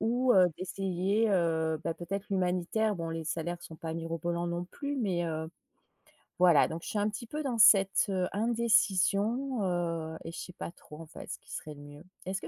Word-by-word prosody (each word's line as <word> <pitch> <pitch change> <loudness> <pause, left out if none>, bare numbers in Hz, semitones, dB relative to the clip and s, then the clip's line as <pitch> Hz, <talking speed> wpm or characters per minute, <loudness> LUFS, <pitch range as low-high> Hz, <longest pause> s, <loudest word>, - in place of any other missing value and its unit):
Ou 245 +3 +2
heu, 185 -4 +6
d'essayer, 195 +3 0
heu, 160 -4 +1
bah - - 0
peut 175 - -9
être 200 +1 -3
l'humanitaire, 190 +3 0
bon 165 -1 -4
les 165 0 -4
salaires 170 +2 -3
sont 160 - -10
pas 160 0 -5
mirobolants 165 +1 -3
non 175 0 -2
plus 285 +9 -5
mais, 190 -9 0
heu. 160 -1 -3 0.9
Voilà, 175 -5 +6
donc 165 +1 -6
je - - -7
suis - - -2
un 205 +1 +1
petit 220 +3 -7
peu 300 +5 -4
dans 250 -5 -2
cette, 195 -1 +6
heu, 185 -2 0
indécision, 225 +2 +2
heu, 165 -3 -2
et 165 - -5
je - - -9
sais 180 - -8
pas - - -6
trop 155 -3 -14
en - - -8
fait, 155 - -11
ce - - -4
qui - - -17
serait 155 -1 -6
le 145 - -12
mieux. 145 +1 -12 0.2
Est-ce 190 +1 -3
que 160 - -7
180 Hz, 210 wpm, -30 LUFS, 165-210 Hz, 0.9 s, heu